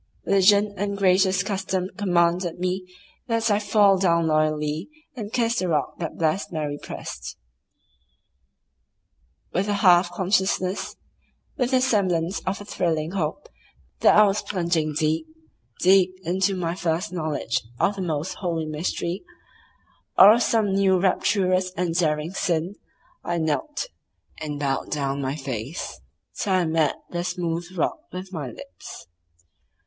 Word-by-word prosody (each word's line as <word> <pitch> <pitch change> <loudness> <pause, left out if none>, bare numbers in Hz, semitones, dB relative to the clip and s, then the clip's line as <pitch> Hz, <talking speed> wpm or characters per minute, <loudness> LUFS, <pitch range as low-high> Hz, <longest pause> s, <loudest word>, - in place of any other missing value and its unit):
Religion 200 +1 +4
and 200 +1 -2
gracious 190 -1 +3
custom 190 -2 -2
commanded 175 -3 +1
me 185 +1 -2 0.4
that 230 -2 +1
I 205 - +3
fall 205 -2 +4
down 170 -3 +3
loyally 155 - 0 0.3
and 215 -4 -6
kiss 235 0 +1
the 185 - -1
rock 150 -4 -1
that 165 -3 -4
blessed 160 +4 0
Mary 150 -3 -3
pressed. 60 0 -7 2.2
With 190 +4 0
a 205 - +1
half 175 0 +6
consciousness, 190 0 0 0.6
with 250 -1 0
the 260 -1 +3
semblance 190 -7 +1
of 190 - -1
a 205 - -9
thrilling 160 -4 -1
hope 185 - -3 0.5
that - - +5
I 210 - +8
was 205 0 +2
plunging 170 -5 -1
deep, 160 - 0 0.5
deep 185 0 +5
into 190 +3 +1
my 170 -2 -2
first 175 +2 -2
knowledge 155 -8 -1 0.2
of 200 - +2
some 190 -3 -4
most 155 +3 -2
holy 170 -4 -2
mystery, 170 +4 -3 0.9
or 205 +3 +10
of 235 - +1
some 220 -4 +2
new 190 -1 +3
rapturous 185 -1 +1
and 175 -1 0
daring 155 -1 0
sin, 175 -1 -1 0.5
I 175 - -1
knelt, 165 - -1 0.5
and 150 -2 -4
bowed 135 -2 -1
down 140 -1 -2
my 135 +1 -2
face 135 0 -5 0.4
till 195 - 0
I 185 -2 +3
met 160 -1 +1 0.2
the 175 0 -2
smooth 175 -1 -2
rock 315 - 0
with 185 +1 -7
my 150 -6 -4
lips. 95 -8 -11
180 Hz, 140 wpm, -24 LUFS, 160-195 Hz, 2.2 s, or